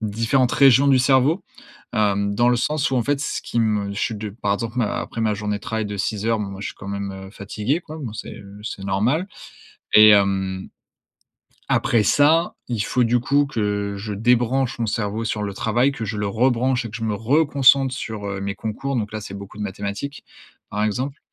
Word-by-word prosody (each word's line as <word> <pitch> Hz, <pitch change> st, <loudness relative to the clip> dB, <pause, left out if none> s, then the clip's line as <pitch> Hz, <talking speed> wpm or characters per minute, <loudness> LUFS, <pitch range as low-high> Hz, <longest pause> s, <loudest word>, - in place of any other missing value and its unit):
différentes 115 Hz, +4 st, +1 dB
régions 140 Hz, 0 st, +6 dB
du 135 Hz, -2 st, +5 dB
cerveau, 135 Hz, +7 st, +3 dB, 0.5 s
hem, 100 Hz, -2 st, +1 dB
dans 120 Hz, +2 st, +3 dB
le 125 Hz, -, +3 dB
sens 150 Hz, +3 st, 0 dB
où, 130 Hz, -, +1 dB
en 120 Hz, -, +2 dB
fait, 140 Hz, +1 st, 0 dB
ce -, -, -3 dB
qui 115 Hz, -, -1 dB
me 105 Hz, -2 st, 0 dB
je 100 Hz, -, -4 dB
suis 120 Hz, -6 st, -1 dB
de 105 Hz, 0 st, -5 dB
par 100 Hz, -1 st, -1 dB
exemple, 115 Hz, +3 st, -4 dB
ma 110 Hz, -4 st, 0 dB
après 115 Hz, -, -5 dB
ma 110 Hz, -2 st, +1 dB
journée 105 Hz, 0 st, -2 dB
de -, -, -23 dB
travail 110 Hz, +1 st, -2 dB
de 100 Hz, -1 st, -5 dB
6 105 Hz, +1 st, -2 dB
heures, 115 Hz, -1 st, +2 dB
bon 105 Hz, -, -3 dB
moi, 100 Hz, 0 st, -8 dB
je -, -, -3 dB
suis -, -, -8 dB
quand 95 Hz, -, -10 dB
même, 100 Hz, 0 st, -4 dB
heu, 95 Hz, 0 st, -9 dB
fatigué, 105 Hz, -, -2 dB
quoi, 160 Hz, -1 st, -9 dB
bon 115 Hz, -6 st, -6 dB
c'est, -, -, -7 dB
heu, 100 Hz, +1 st, -12 dB
c'est 100 Hz, -2 st, -6 dB
normal 120 Hz, -, 0 dB, 0.7 s
et 110 Hz, 0 st, +9 dB
hem, 95 Hz, -2 st, +2 dB, 1.1 s
après 115 Hz, -3 st, +3 dB
ça, 155 Hz, -, +3 dB
il 120 Hz, -4 st, -3 dB
faut 120 Hz, +4 st, +1 dB
du 120 Hz, +1 st, +2 dB
coup, 140 Hz, +4 st, +2 dB
que 105 Hz, -5 st, -2 dB
je 105 Hz, +1 st, -5 dB
débranche 120 Hz, +3 st, +1 dB
mon 115 Hz, -, +1 dB
cerveau 105 Hz, +1 st, -2 dB
sur 105 Hz, -1 st, -2 dB
le 100 Hz, -1 st, -4 dB
travail, 120 Hz, +7 st, +1 dB
que 115 Hz, -, -5 dB
je 105 Hz, +1 st, -4 dB
le 105 Hz, 0 st, -1 dB
rebranche 125 Hz, +3 st, +1 dB
et 115 Hz, -, -6 dB
que 105 Hz, -, -6 dB
je 115 Hz, -, -4 dB
me 105 Hz, -2 st, 0 dB
reconcentre 135 Hz, +2 st, +3 dB
sur, 110 Hz, -5 st, -5 dB
heu, 100 Hz, -1 st, -4 dB
mes 100 Hz, 0 st, -3 dB
concours. 125 Hz, +5 st, -3 dB
Donc 105 Hz, -2 st, -2 dB
là, 110 Hz, -, -4 dB
c'est 100 Hz, -1 st, -8 dB
beaucoup 100 Hz, +1 st, -9 dB
de -, -, -4 dB
mathématiques, 100 Hz, +8 st, -5 dB, 0.5 s
par 105 Hz, +1 st, -2 dB
exemple 130 Hz, +7 st, -2 dB
110 Hz, 220 wpm, -22 LUFS, 100-130 Hz, 1.1 s, et